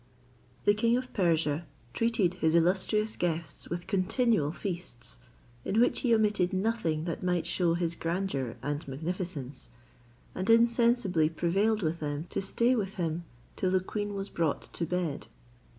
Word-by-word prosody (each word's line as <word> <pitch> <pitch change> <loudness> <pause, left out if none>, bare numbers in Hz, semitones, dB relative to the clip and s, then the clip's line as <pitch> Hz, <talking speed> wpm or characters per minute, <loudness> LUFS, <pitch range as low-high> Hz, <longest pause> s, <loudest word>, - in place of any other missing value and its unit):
The 205 - +6
king 230 +3 +2
of 255 0 -5
Persia 165 -4 +1 0.3
treated 225 -6 +2
his 160 -3 +1
illustrious 190 +5 +2
guests 165 -3 -3
with 175 +1 -4
continual 200 - +1
feasts; 170 - -5 0.4
in 215 - +1
which 245 - +3
he 245 - +1
omitted 210 -4 +2
nothing 190 -6 0
that 170 - -3
might 180 -2 0
shew 175 -1 +1
his 170 -1 0
grandeur 165 -8 -2
and 145 +2 -3
magnificence, 150 -2 -4 0.6
and 185 +3 -3
insensibly 230 -7 +4
prevailed 195 +6 +1
with 165 +1 -1
them 145 +1 -3
to - - -1
stay 235 +6 +2
with 200 -3 -2
him 170 -1 -2 0.3
till 185 - 0
the 185 0 +3
queen 205 +2 -4
was 195 0 -4
brought 165 -4 -2
to 170 - -2
bed. 170 -10 -2
180 Hz, 150 wpm, -30 LUFS, 160-210 Hz, 0.6 s, The